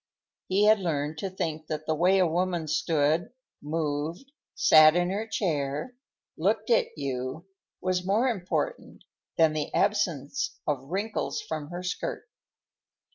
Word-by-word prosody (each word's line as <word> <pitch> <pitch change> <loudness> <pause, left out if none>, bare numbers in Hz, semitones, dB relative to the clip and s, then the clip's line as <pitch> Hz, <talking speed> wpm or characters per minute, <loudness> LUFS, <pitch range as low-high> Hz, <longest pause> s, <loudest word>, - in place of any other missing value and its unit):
He 200 +3 +3
had 215 0 +6
learned 155 -3 -2
to 195 - -3
think 160 -4 -4
that 155 0 -4
the 160 - +1
way 180 +5 +3
a 185 - +4
woman 175 -1 0
stood, 155 +2 +1 0.3
moved, 155 - -3 0.2
sat 155 0 +7
in 175 +1 +1
her 210 +3 -2
chair, 155 - -2 0.4
looked 210 +7 0
at 230 - +2
you, 135 +3 -4 0.4
was 185 -1 0
more 210 +7 +2
important 235 - -3 0.3
than 160 -2 +4
the 155 -1 -3
absence 175 -10 0
of 135 -3 -1
wrinkles 205 +5 -2
from 155 -2 -5
her 175 +1 -6
skirt. 180 - -4
170 Hz, 135 wpm, -27 LUFS, 155-195 Hz, 0.4 s, sat